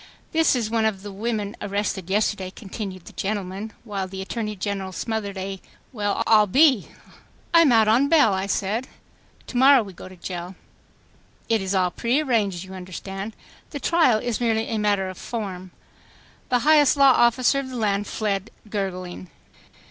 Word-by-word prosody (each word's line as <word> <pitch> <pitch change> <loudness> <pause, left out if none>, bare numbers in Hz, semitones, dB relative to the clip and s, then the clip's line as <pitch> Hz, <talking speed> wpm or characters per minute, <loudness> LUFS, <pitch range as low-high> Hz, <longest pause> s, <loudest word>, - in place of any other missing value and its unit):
"This 320 -3 +3
is 225 -3 -2
one 225 -1 +1
of 200 -3 -1
the 205 - -7
women 210 +1 -3
arrested 200 -2 -2
yesterday," 205 -1 0
continued 195 -2 -7
the - - -12
gentleman, 200 +1 -4
while 200 -4 -4
the 190 +1 -8
Attorney 215 +1 -4
General 195 -1 -3
smothered 205 +1 -3
a 195 0 -5 0.3
"Well, 205 -3 -1
I'll 215 -2 +5
be.. 260 0 +4 0.3
." - - -32
"I 335 - +8
am 305 -6 +5
out 225 -2 +5
on 240 +6 +4
bail," 290 -10 +5
I 190 +1 -2
said. 215 +6 -1 0.3
" - - -32
To 245 - -5
morrow 265 -1 +7
we 195 -2 -10
go 185 - -11
to 185 - -13
jail. 180 +1 -6 0.9
It 225 -2 +2
is 190 +1 -2
all 180 -1 +2
prearranged, 235 - 0
you 190 0 -11
understand. 195 +3 -7 0.3
The 285 - -6
trial 320 -6 +3
is 240 +1 -3
merely 225 -1 +1
a 220 - -1
matter 205 -2 +1
of 185 - -8
form." 190 -6 -5 0.8
The 250 - +3
highest 300 -2 +5
law 275 -1 +7
officer 250 +3 +3
of 270 -1 -5
the 255 - -7
land 205 -2 0
fled 205 -1 -2 0.2
gurgling. 185 -3 -4
210 Hz, 175 wpm, -23 LUFS, 190-235 Hz, 0.9 s, I